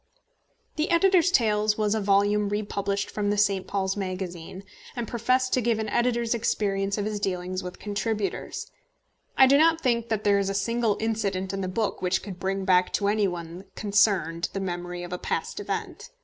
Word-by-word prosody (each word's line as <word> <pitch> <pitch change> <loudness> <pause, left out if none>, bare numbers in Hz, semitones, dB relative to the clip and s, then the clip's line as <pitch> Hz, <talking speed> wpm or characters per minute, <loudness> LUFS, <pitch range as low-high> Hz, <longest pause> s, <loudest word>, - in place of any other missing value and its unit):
The 310 +4 0
Editor's 365 0 +4
Tales 215 -8 +2
was 210 -1 +1
a 220 - 0
volume 205 +1 +2
republished 200 -1 -2
from 205 -1 -1
the 205 - 0
St. 200 -2 +1
Paul's 190 -1 -1
Magazine, 185 -2 -5 0.3
and 240 -2 -3
professed 255 +3 +1
to 255 - +3
give 230 -1 +1
an 220 -1 -3
editor's 235 -1 +1
experience 200 -3 0
of 205 - -1
his 210 -1 -2
dealings 185 -1 -2
with 180 -1 -7
contributors. 210 0 -3 0.7
I 265 - +8
do 275 +2 +5
not 325 +1 +4
think 235 -5 0
that 215 -2 -1
there 200 -1 +4
is 195 0 0
a 195 - -2
single 225 +1 0
incident 200 -4 -1
in 195 - -2
the 185 - -2
book 210 +3 -2
which 185 0 0
could 190 -3 -8
bring 195 +1 -2
back 180 -1 +3
to 200 -1 +1
any 210 -1 +2
one 175 0 -6
concerned 200 -5 +1
the 195 - -2
memory 175 -1 -4
of 175 0 -6
a 180 - -3
past - - -3
event. - - -5
205 Hz, 190 wpm, -26 LUFS, 190-225 Hz, 0.7 s, I